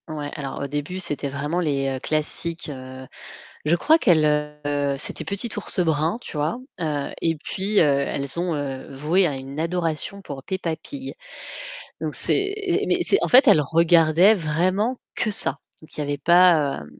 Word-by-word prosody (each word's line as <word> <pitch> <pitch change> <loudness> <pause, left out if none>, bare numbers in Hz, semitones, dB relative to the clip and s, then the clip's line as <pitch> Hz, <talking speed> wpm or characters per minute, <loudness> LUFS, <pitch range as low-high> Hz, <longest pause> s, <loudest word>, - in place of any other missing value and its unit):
Ouais, 150 -2 -5
alors 140 -2 -6
au 140 - -3
début, 145 +6 -4
c'était 150 -5 -3
vraiment 145 +5 -3
les 135 -5 -1
classiques, 155 +2 -3
heu, 130 -1 -9 0.6
je 165 +3 +3
crois 315 - +4
qu'elles, 170 - +3
heu, 150 -2 -1
c'était - - 0
petit 200 +4 -4
Ours 205 -1 0
Brun, 160 +1 +1
tu - - -9
vois 155 +9 -1 0.2
et 155 +1 -2
heu, - - -14
puis 200 +3 -3
elles 140 -2 +1
ont 145 -6 -3
voué 160 +7 +2
à 145 -4 -2
une 135 +3 -7
adoration 170 +3 -3
pour 140 -6 -8
Peppa 180 0 -3
Pig. 265 - -8 0.9
Donc - - -2
c'est 395 0 +4 0.3
heu, - - 0
mais - - +1
c'est 400 - +2
en - - 0
fait, 260 +2 +6
elles 190 -8 +6
regardaient 165 +5 +4
vraiment 185 +8 -1
que 215 - -1
ça. 205 - +5 0.3
Il 155 - -15
y - - -1
avait 145 0 -3
pas, 165 - +4
heu, - - -12
155 Hz, 170 wpm, -23 LUFS, 145-180 Hz, 0.9 s, fait